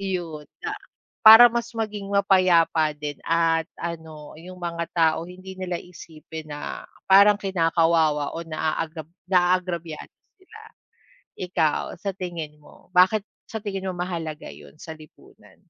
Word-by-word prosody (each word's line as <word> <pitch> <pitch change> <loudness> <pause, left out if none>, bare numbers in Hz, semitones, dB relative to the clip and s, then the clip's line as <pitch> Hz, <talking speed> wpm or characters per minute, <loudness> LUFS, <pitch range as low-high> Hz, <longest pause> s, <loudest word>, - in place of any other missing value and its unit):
'Yon 175 -6 -4 0.2
na 430 - -2 0.5
para 225 +2 +11
mas 235 0 -2
maging 210 -3 -4
mapayapa 180 -5 +3
din 145 -1 -6
at 165 -1 +2
ano 160 -3 -7
yung 180 +2 -11
mga 170 -1 -3
tao 165 0 +2
hindi 185 +1 -10
nila 180 -1 -3
isipin 160 -2 -11
na 145 0 -7 0.2
parang 200 +1 +7
kinakawawa 165 -5 +1
o 165 - -4
naag 160 0 -3 0.3
naagrabyado 175 -3 0 0.3
sila. 405 +4 -16 0.8
Ikaw 170 -4 -1
sa 195 +1 -3
tingin 170 -5 -6
mo, - - -20
bakit 185 +4 +5 0.3
sa 220 -2 -5
tingin 195 -2 -4
mo - - -4
mahalaga 165 -4 -5
yun - - -15
sa 160 - -8
lipunan? 155 -1 -19
170 Hz, 130 wpm, -24 LUFS, 160-190 Hz, 0.8 s, para